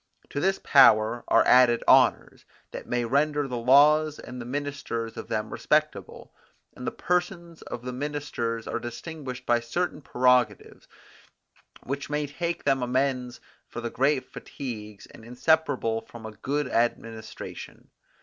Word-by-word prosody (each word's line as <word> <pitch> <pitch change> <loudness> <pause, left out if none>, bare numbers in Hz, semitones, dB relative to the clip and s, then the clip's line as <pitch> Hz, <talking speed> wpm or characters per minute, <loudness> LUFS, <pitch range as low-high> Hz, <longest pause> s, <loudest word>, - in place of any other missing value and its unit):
To 145 - -3
this 195 +4 +1
power 120 -3 +5
are - - +4
added 125 -2 +5
honours, - - +3 0.3
that - - -8
may 120 -1 -1
render 145 +3 +1
the 125 -2 -4
laws 150 +5 +5
and 125 0 -9
the - - -7
ministers 140 -4 -4
of - - -7
them 110 0 -3
respectable; 150 -11 -1 0.4
and - - -7
the - - 0
persons 175 -2 -2
of 120 - -8
the 125 0 -5
ministers 125 -5 -4
are - - -2
distinguished 130 +2 -7
by 120 0 +3
certain 150 +7 -3
prerogatives, 125 -5 +1 1.0
which 140 +2 -5
may 150 -1 -3
make 170 0 -2
them 135 -2 +1
amends 125 0 -1 0.3
for - - -7
the 120 0 -4
great 135 0 +1
fatigues 105 -6 -8
inseparable 125 -1 0
from 115 0 -12
a 110 - -6
good 140 +6 -3
administration. 115 -2 -4
125 Hz, 140 wpm, -26 LUFS, 120-145 Hz, 1.0 s, power